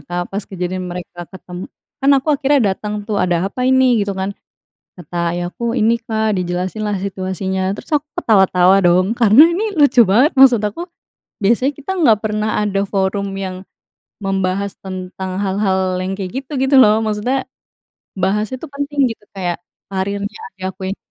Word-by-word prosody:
Kak. 175 0 -2
Pas 200 +1 -3
kejadian 185 0 -4
mereka 175 0 -8
ketem 180 -1 -9 0.3
kan 275 +1 +3
aku 275 - -8
akhirnya 280 0 +2
datang, 210 +2 -5
tuh, 210 -1 -2
“Ada 175 -1 +1
apa 225 - -8
ini?” 260 -3 +4
Gitu, 200 -1 -1
kan. 190 +1 -2 0.7
Kata 175 -1 -10 0.2
ayahku, 175 +7 -3
“Ini, 225 -1 +3
Kak.” 220 -2 0
Dijelasin 180 +3 -3
lah 205 -1 -1
situasinya. 190 0 -2
Terus - - -12
aku 290 - -3 0.2
ketawa-tawa 190 - +4
dong, 180 +1 +4
karena 230 +3 +7
ini 420 +5 -1
lucu 280 -3 +5
banget. 245 +10 +4
Maksud 260 -4 +7
aku, 335 - -4 0.5
biasanya 235 +7 +2
kita 290 +6 -7
nggak 230 - +4
pernah 215 0 -1
ada 200 -1 0
forum 195 0 -1
yang 185 -1 -5 0.6
membahas 195 0 -1
tentang 185 0 -5
hal-hal 190 -2 0
yang 185 +1 -3
kayak 190 -2 -5
gitu, 265 - -54
gitu 270 +1 +1
lo. 215 -1 +5
Maksudnya, 220 +5 -1 0.8
bahasnya 210 +6 0
tuh 325 - -8
penting, 285 0 -4
gitu. 220 - -11
Kayak 180 -3 -2 0.3
karirnya 200 +2 -3 0.2
ayahku 190 +1 -6
yang 200 - -6
200 Hz, 160 wpm, -18 LUFS, 185-230 Hz, 0.8 s, karena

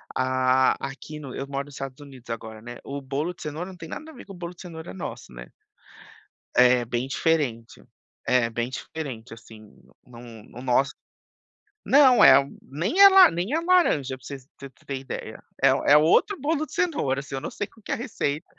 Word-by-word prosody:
a 130 0 +2
aqui 140 +3 -8
no 140 -4 -8
eu 135 - -4
moro 140 0 -4
nos 145 - -14
Estados 135 0 -7
Unidos 130 -4 -14
agora, 110 -1 -7
né, 120 +1 -9
o 140 0 -6
bolo 145 +6 -3
de - - -18
cenoura, 155 +5 -5
não 185 - -12
tem 165 -1 -10
nada 315 - -8
a - - -16
ver, 245 - -12
com 195 - -11
o 180 - -12
bolo 175 0 -7
de - - -13
cenoura 160 - -9
nosso, 95 - -8
né. - - -10 1.1
É 125 -1 +5
bem 120 +3 -2
diferente, 125 - -1 0.4
é 125 -2 +3
bem 120 +1 -3
diferente, 130 -4 -7
assim, 115 -1 -14 0.5
não 120 -1 -13
não 115 0 -12
o - - -8
nosso 130 +2 +1 1.0
não 260 -5 +6
é, 135 +1 +8 0.2
nem 180 - -2
é 400 - +12
la 385 - +8
nem 180 - -3
é 325 - +1
laranja, 335 - +2
para - - -22
você 140 - -6 0.2
para 140 - -9
você - - -26
ter 140 - -3
ideia, 135 - -7 0.2
é - - +7 0.2
é - - +9
outro 160 - +3
bolo 310 +1 -1
de - - -18
cenoura, 290 - 0
assim, 135 -1 -7
eu 135 - -4
não - - -5
sei 205 - -5
qual 225 - -22
que - - -4
é - - +3
a 275 - -6
receita, 175 - -3
140 Hz, 215 wpm, -25 LUFS, 125-180 Hz, 1.1 s, é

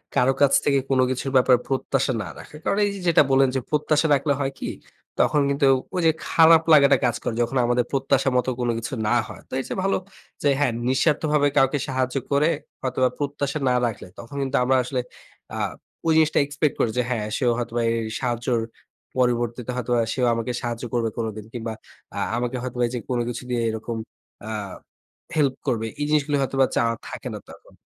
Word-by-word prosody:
কারো 130 +2 +4
কাছ 140 -1 +5
থেকে 140 -1 +3
কোন 130 -1 +2
কিছুর 130 +1 -2
ব্যাপারে 125 -1 +6
প্রত্যাশা 135 0 0
না - - -7
রাখা। - - -12
কারণ 200 - +1
এই - - 0
যে - - -7
যেটা 165 -3 +6
বললেন 135 0 +5
যে 130 - +2
প্রত্যাশা 150 +1 +2
রাখলে 140 +1 +1
হয় 135 -1 -1
কি? - - -3 0.5
তখন 150 - +3
কিন্তু 140 0 +1 0.3
ঐ - - -5
যে 160 - +6 0.2
খারাপ 165 0 +7
লাগাটা 140 -2 +7
কাজ 120 -1 +1
করে। - - -1
যখন 120 +3 0
আমাদের 120 0 +1
প্রত্যাশা 135 0 +1
মত 125 - +1
কোন 120 - 0
কিছু 130 +5 -6
না 120 - +3
হয়। - - -10
তো - - -12
এর - - -2
চেয়ে - - -4
ভালো 195 - +2 0.5
যে 145 - +4
হ্যাঁ, 125 -5 +2
নিঃস্বার্থভাবে 150 +2 +2
কাউকে 135 +1 +4
সাহায্য 130 -1 -1 0.2
করে 145 +3 +3 0.3
হয়তোবা 130 -1 +1
প্রত্যাশা 145 0 -2
না - - +3
রাখলে 115 -5 -4
তখন 115 +4 -10
কিন্তু 135 +1 0
আমরা 130 +1 +3
আসলে 125 +1 -2 0.5
আ - - -4 0.5
ঐ - - -1
জিনিসটা 160 -1 +4
এক্সপেক্ট 145 0 -1
করি 115 - +2
যে 125 - +3
হ্যাঁ 110 -4 -1
সেও 125 -2 +2
হয়তোবা 120 -1 -2
এই 115 - 0 0.2
সাহায্যের 120 -1 -1 0.6
পরবর্তীতে 120 -1 0
হয়তোবা 120 -1 0
সেও 125 - +1
আমাকে 115 +2 -2
সাহায্য 120 0 -4
করবে 115 -2 +1
কোনদিন 110 -2 -4
কিংবা 115 -2 -4 0.4
আ - - -5 0.2
আমাকে 125 +1 -2
হয়তো 125 -1 -5
বা - - +4
যে 120 - -2
কোন 125 - 0
কিছু 120 +1 -5
দিয়ে 120 -1 0
এরকম 110 +1 -4 0.5
আ - - -5 0.9
হেল্প 140 -4 +2
করবে। 115 -3 0
এই 145 - 0
জিনিসগুলো 145 -1 +2
হয়তোবা 135 0 +2
চাওয়া 115 0 +2
থাকে - - -7
না - - -5
তখন। - - -15
130 Hz, 195 wpm, -23 LUFS, 120-140 Hz, 0.9 s, খারাপ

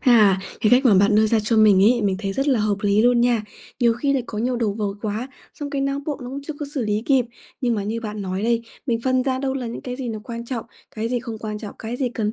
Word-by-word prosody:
À, 215 -6 +5 0.2
cái 215 - +3
cách 255 +2 +5
mà 220 -5 +6
bạn 200 +2 +4
đưa 215 +1 +5
ra 225 +1 +2
cho 215 +2 0
mình 205 -3 +6
ấy, 240 +1 +4
mình 195 -2 +1
thấy 195 -2 -3
rất 270 +6 -1
là 250 -6 +3
hợp 210 -1 +1
lý 205 +1 +3
luôn 245 0 +4
nha, 240 -3 +2 0.4
nhiều 235 -1 +5
khi 275 +4 0
lại 265 -3 +1
có 210 - -5
nhiều 245 +2 0
đầu 220 -4 0
vợt 205 -1 -3
quá, 220 +4 -3 0.3
xong 290 -1 -6
cái 280 - -2
não 275 0 -1
bộ 295 - -2
nó 245 - -6
cũng 275 - -5
chưa 310 - -3
có 295 - -3
xử 255 -5 -1
lý 210 0 0
kịp. 265 -4 +4 0.4
Nhưng 240 -3 +1
mà 205 - -1
như 225 +2 -2
bạn 210 -2 -5
nói 190 +1 -3
đây, 230 0 +1 0.2
mình 230 -2 0
phân 255 -1 +2
ra 260 -1 0
đâu 265 0 -1
là 255 -3 -3
những 230 - -5
cái 250 -1 -5
gì 255 -3 -4
nó 220 -1 -4
quan 235 -2 -6
trọng, 235 -2 -4 0.3
cái 225 +1 -3
gì 245 -1 -1
không 225 -2 -6
quan 215 -1 -5
trọng, 210 -2 -8
cái 230 +2 -5
gì 255 -2 0
cần 220 -2 -2
230 Hz, 300 wpm, -22 LUFS, 210-250 Hz, 0.4 s, mà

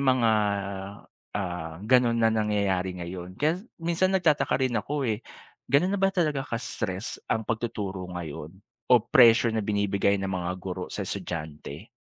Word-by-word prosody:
mga, 130 -4 +3 1.1
ah, 90 -4 -4
ganun 120 -1 +4
na 115 -1 +3
nangyayari 100 -4 0
ngayon. 90 +1 -7
Kaya 160 +5 +1 0.2
minsan 170 +3 +1
nagtataka 160 -5 +2
rin 130 -2 +1
ako 145 +2 -2
eh, 110 -1 -1 0.5
gano'n 180 +8 +4
na - - -4
ba 195 - +5
talaga 155 -7 0
ka-stress 115 -4 -4
ang 110 -1 +1
pagtuturo 105 -5 -3
ngayon 80 -2 -6 0.4
o 125 - +9
pressure 120 -4 +6
na 110 - 0
binibigay 100 -1 +1
ng 95 - -2
mga 90 -2 -2
guro 90 0 -5
sa 100 - -3
estudyante, 80 -6 -6
110 Hz, 145 wpm, -27 LUFS, 95-130 Hz, 1.1 s, o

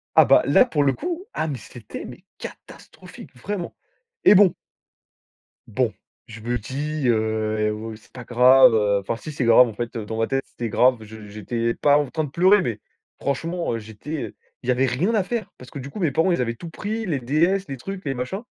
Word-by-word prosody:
Ah - - +8
bah - - +5
là - - +6
pour 150 - 0
le 135 -1 +3
coup, 355 +4 -5
ah 160 - -2
mais 140 -5 -4
c'était 115 -4 -10
mais - - -11
catastrophique - - -12
vraiment 185 +6 -5 0.5
et - - +8
bon 195 -3 +6 1.1
bon, - - 0 0.3
je 115 -1 -11
me 120 +2 -2
dis, 140 +4 -3
heu: 110 -1 0
«Oh 110 +1 -7
c'est 105 - -17
pas 125 -2 -9
grave». 125 +1 +6
Heu, 100 -2 +2
enfin 105 +4 -3
si 155 - -8
c'est 130 - -2
grave 115 +2 +7
en 110 - -8
fait 120 0 -4
dans 110 +1 -5
ma 115 - +1
tête, 135 0 -1
c'était 115 -3 -6
grave, 125 +3 +4
je 110 -1 -11
j'étais 115 +3 -2
pas 145 0 +4
en 145 -3 -2
train 155 -2 -2
de 140 - -6
pleurer, 185 +5 +4
mais 110 -7 -3 0.4
franchement 165 -1 -2
j'étais, 110 +8 -7
heu, - - -17 0.3
il 125 - -9
y - - +5
avait 130 +2 +2
rien 160 - 0
à 210 - +3
faire, 230 +3 -4
parce 125 - -13
que - - -8
du 140 +1 -7
coup 210 - -8
mes 165 -5 +2
parents, 165 +6 +2
ils 170 - 0
avaient 115 -1 -1
tout 165 +7 -9
pris, 220 +5 -4
les 155 -8 -1
DS, 170 +10 +1
les 135 - -5
trucs, 195 +8 -7
les 135 - -1
machins, 125 +11 -4
130 Hz, 220 wpm, -23 LUFS, 115-165 Hz, 1.1 s, Ah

